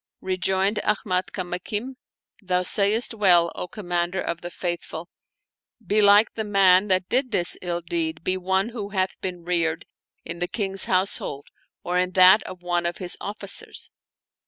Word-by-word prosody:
Rejoined 190 +2 0
Ahmad 185 -3 -1
Kamakim, 195 +7 -5 0.2
" - - -35
Thou 180 -2 0
sayest 210 +6 +3
well, 175 -6 +3
O - - -5
Commander 175 -1 -3
of 170 - -4
the 175 - -6
Faith 175 -1 -4
ful; 165 +2 -9 0.8
belike 205 +2 +5
the 220 - -3
man 195 -2 +4
that 185 -1 +1
did 255 +1 0
this 180 -6 +2
ill 175 -1 -3
deed 165 -1 -3
be 185 - -1
one 190 +3 -1
who 215 -4 -6
hath 190 -2 -2
been 180 -2 -5
reared 170 -2 -1 0.4
in 170 +1 -7
the 175 - -1
King's 195 -1 +1
household 185 -6 0 0.4
or 180 +1 0
in 180 0 -1
that 185 +3 +7
of 185 -1 -10
one 175 -1 -1
of 170 - -4
his 180 -1 0
oflScers." 205 +1 -4
185 Hz, 160 wpm, -23 LUFS, 175-200 Hz, 0.8 s, that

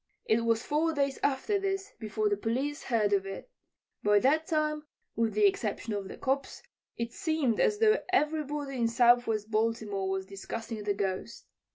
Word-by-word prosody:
It 225 +1 +2
was 230 0 +2
four 320 +2 +1
days 280 -1 0
after 285 +9 +1
this 390 0 -2
before 215 -1 -1
the 205 - +2
police 260 +8 -2
heard 215 -5 +1
of 195 -1 +1
it. 195 - -8 0.5
By 210 0 +4
that 295 +8 +3
time, 305 -2 0 0.3
with 225 -2 0
the 210 -1 +4
exception 210 +2 0
of 200 -2 -3
the - - -9
"cops," 275 +1 -2 0.3
it 235 0 -3
seemed 315 - 0
as 425 - +3
though 440 +1 +4
everybody 295 -5 0
in 235 -1 +2
Southwest 235 -2 +3
Baltimore 215 -3 0
was 190 0 -2
discussing 215 +3 -6
the 205 -1 +1
Ghost. 195 +3 -3
235 Hz, 170 wpm, -30 LUFS, 210-295 Hz, 0.5 s, By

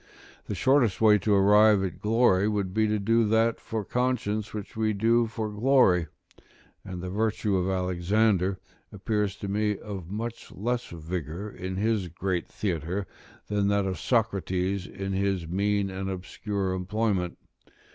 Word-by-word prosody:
The - - -3
shortest 125 -9 +3
way 105 -2 +6
to 105 +2 +1
arrive 105 +1 +5
at 95 -4 -4
glory, 105 -3 +3
would 100 -3 -2
be 110 +1 +2
to 105 0 +1
do 115 +3 +2
that 110 +1 +2
for 110 -2 -4
conscience 110 -4 -1
which 105 -2 -7
we 110 -1 +1
do 115 +3 +3
for 110 0 -4
glory: 105 -7 +3 0.8
and 90 -2 -7
the 90 - -4
virtue 105 0 0
of 95 0 0
Alexander 95 +1 +1 0.3
appears 105 0 -1
to 100 - -6
me 105 +1 0
of 95 -5 -7
much 115 +3 -5
less 120 +4 -2
vigour 85 +4 -5
in 95 0 -5
his 105 -1 0
great 90 +1 -2
theatre, 90 0 -3 0.4
than 100 -1 0
that 100 -1 +2
of 95 -1 -3
Socrates 100 -5 0
in 95 0 -5
his 95 -3 0
mean 100 +2 0
and 95 +1 -4
obscure 95 +1 -3
employment. 95 -1 -1
100 Hz, 150 wpm, -27 LUFS, 95-110 Hz, 0.8 s, way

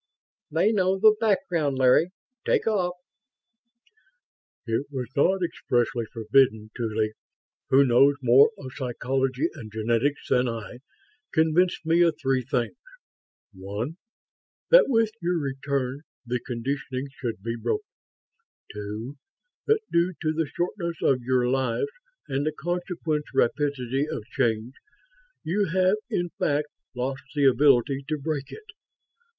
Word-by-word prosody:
"They 170 +8 +2
know 190 -3 +2
the 215 +2 +6
background, 170 - +1
Larry. 130 +6 +4 0.3
Take - - +1
off." 185 -5 0 1.7
"It 115 +4 -1
was 130 -3 -4
not 185 +6 +3
expressly 120 -7 0
forbidden. 110 -2 +2
Tuly, 110 -2 -1 0.6
who 140 +1 +6
knows 135 +3 +5
more 125 +3 +7
of 130 -7 -8
psychology 130 +3 -1
and 110 -2 -10
genetics 115 +6 0
than 125 0 +2
I, 115 +1 -6 0.5
convinced 165 +2 +2
me 165 +2 +3
of 170 -2 +3
three 135 -2 +1
things. 120 0 -1 0.8
One, 100 - -5 0.7
that - - +8
with 225 -4 +2
your 175 +1 0
return 135 -2 -2 0.2
the 125 +1 -1
conditioning 130 +2 -4
should 115 -7 -5
be 115 +1 -2
broken. 420 - -2 0.9
Two, 105 +6 -6 0.5
that 440 0 +3
due 170 +2 +2
to 155 -1 0
the 160 -1 -1
shortness 175 +1 -3
of 130 -2 +3
your 125 0 +1
lives 130 - 0 0.4
and 135 +1 -1
the 155 - 0
consequent 170 -2 -3
rapidity 140 +1 0
of - - -4
change, 115 -1 0 0.7
you 200 +5 +1
have 185 +3 +2
in 175 0 -1
fact 150 +1 0 0.3
lost 135 +3 -3
the 145 -1 +3
ability 135 0 +4
to 155 - -1
break 145 -1 -4
it. 440 - -10
135 Hz, 125 wpm, -26 LUFS, 125-170 Hz, 1.7 s, that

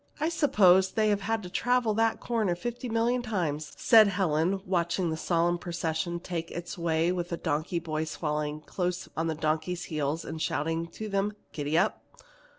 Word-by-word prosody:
"I 310 +2 +1
suppose 190 - +4
they 215 -1 +2
have 205 -2 -1
traveled 245 -1 +1
to - - +3
that 225 0 +2
corner 220 -7 0
fifty 240 +6 -5
million 230 +2 +1
times," 165 -10 -2
said 220 -2 +7
Helen, 185 -1 +1
watching 175 -1 0
the - - -1
solemn 170 +1 +1
procession 170 0 -2
take 170 -2 -4
its 175 0 -6
way 165 0 +1
with 175 -1 -2
the 170 - -2
donkey 160 +2 -1
boys 160 -2 -3
following 150 -1 -2
close 180 +3 -3
on 165 +1 -1
the 160 - -1
donkeys' 155 +3 -1
heels 155 0 -2
and 160 0 -5
shouting 165 +3 -1
to 215 +6 -7
them 200 +1 0 0.2
to 150 - -4
"Giddap!" 155 +4 +1
175 Hz, 170 wpm, -28 LUFS, 160-205 Hz, 0.2 s, said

